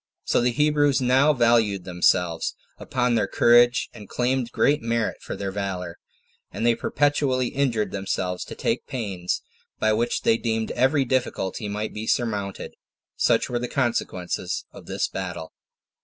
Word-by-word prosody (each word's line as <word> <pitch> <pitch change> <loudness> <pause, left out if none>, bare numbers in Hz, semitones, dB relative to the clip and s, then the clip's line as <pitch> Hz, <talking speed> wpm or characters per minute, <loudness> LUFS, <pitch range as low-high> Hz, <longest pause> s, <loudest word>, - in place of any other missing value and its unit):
So - - +2
the 125 - +3
Hebrews 145 +1 +2
now 130 +4 +4
valued 115 -7 +2
themselves 90 -2 +1 0.2
upon 125 -1 0
their 115 - +2
courage, 120 +1 +4
and 105 -4 -12
claimed 125 -1 0
great 145 +4 +2
merit 115 0 -1
for - - -6
their 100 -1 -4
valor; 95 -3 -4 0.5
and 105 +5 -3
they 120 - +5
perpetually 135 -1 0
inured 115 -8 0
themselves 95 -2 -2
to - - -8
take 115 - -2
pains, 100 -9 -3 0.3
by 110 0 +2
which 120 +2 0
they 115 - +4
deemed 110 -1 -1
every 130 +3 +2
difficulty 120 -5 -1
might 105 +1 -3
be 110 +1 -5
surmounted. 105 -5 -2 0.4
Such - - +2
were 120 - -2
the 125 - -3
consequences 120 -9 -2
of - - -13
this - - -1
battle. 90 -4 -6
115 Hz, 150 wpm, -24 LUFS, 100-125 Hz, 0.5 s, they